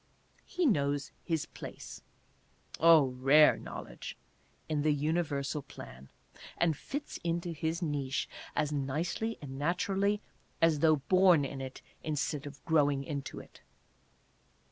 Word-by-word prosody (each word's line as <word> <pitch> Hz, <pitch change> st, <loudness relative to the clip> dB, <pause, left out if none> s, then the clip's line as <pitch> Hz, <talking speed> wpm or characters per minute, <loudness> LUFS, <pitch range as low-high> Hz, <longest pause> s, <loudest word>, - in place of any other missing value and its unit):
He 360 Hz, -1 st, 0 dB
knows 145 Hz, -, +1 dB
his 165 Hz, -3 st, -1 dB
place -, -, -9 dB, 0.8 s
(oh, 160 Hz, -4 st, +7 dB
rare 145 Hz, +4 st, +7 dB
knowledge -, -, -8 dB, 0.3 s
!) -, -, -37 dB
in 155 Hz, -2 st, 0 dB
the 150 Hz, 0 st, +3 dB
universal 150 Hz, -1 st, -1 dB
plan, 65 Hz, -, -11 dB, 0.5 s
and 165 Hz, -2 st, +2 dB
fits 285 Hz, -, -6 dB
into 170 Hz, 0 st, -1 dB
his 165 Hz, +2 st, -2 dB
niche 140 Hz, -4 st, -1 dB, 0.3 s
as 150 Hz, -, +1 dB
nicely 150 Hz, +11 st, -2 dB
and 135 Hz, -1 st, -7 dB
naturally 195 Hz, +6 st, +1 dB, 0.4 s
as 165 Hz, -2 st, +4 dB
though 155 Hz, +1 st, +5 dB
born 175 Hz, +1 st, +4 dB
in 135 Hz, 0 st, -5 dB
it 130 Hz, 0 st, -7 dB, 0.2 s
instead 150 Hz, -1 st, -2 dB
of 140 Hz, -1 st, -12 dB
growing 145 Hz, -4 st, +3 dB
into 140 Hz, -2 st, -5 dB
it. -, -, -15 dB
150 Hz, 125 wpm, -31 LUFS, 140-170 Hz, 0.8 s, oh